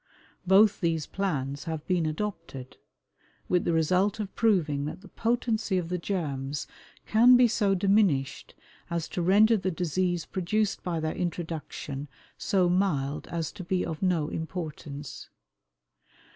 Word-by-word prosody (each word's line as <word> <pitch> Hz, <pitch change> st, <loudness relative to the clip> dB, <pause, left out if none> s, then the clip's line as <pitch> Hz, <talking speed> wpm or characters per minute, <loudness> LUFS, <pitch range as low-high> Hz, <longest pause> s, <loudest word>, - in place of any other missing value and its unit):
Both 200 Hz, +2 st, +5 dB
these 165 Hz, -4 st, 0 dB
plans 145 Hz, -8 st, -3 dB
have 160 Hz, -2 st, -4 dB
been 175 Hz, -4 st, +1 dB
adopted, 155 Hz, -7 st, -5 dB, 0.7 s
with 180 Hz, -1 st, +1 dB
the -, -, +2 dB
result 185 Hz, +6 st, +2 dB
of 205 Hz, -2 st, -4 dB
proving 160 Hz, -11 st, +1 dB
that 155 Hz, -, -6 dB
the 200 Hz, -, -13 dB
potency 225 Hz, -2 st, 0 dB
of 175 Hz, -2 st, -2 dB
the 180 Hz, 0 st, -2 dB
germs 145 Hz, -7 st, -3 dB, 0.4 s
can 245 Hz, +3 st, +6 dB
be 245 Hz, -1 st, +6 dB
so 205 Hz, -4 st, +1 dB
diminished 190 Hz, -8 st, +1 dB, 0.3 s
as 170 Hz, -2 st, -2 dB
to 180 Hz, -, -3 dB
render 210 Hz, +6 st, +5 dB
the 190 Hz, -1 st, -1 dB
disease 175 Hz, 0 st, -1 dB
produced 195 Hz, +3 st, -1 dB
by 175 Hz, -3 st, -2 dB
their 155 Hz, 0 st, -2 dB
introduction 160 Hz, -5 st, -4 dB, 0.3 s
so 185 Hz, -3 st, +1 dB
mild 155 Hz, -6 st, 0 dB
as 165 Hz, -2 st, -3 dB
to 185 Hz, -, -8 dB
be 180 Hz, +1 st, -1 dB
of 160 Hz, -2 st, -5 dB
no 170 Hz, -5 st, +1 dB
importance. 155 Hz, -4 st, -6 dB
175 Hz, 140 wpm, -28 LUFS, 155-195 Hz, 0.7 s, can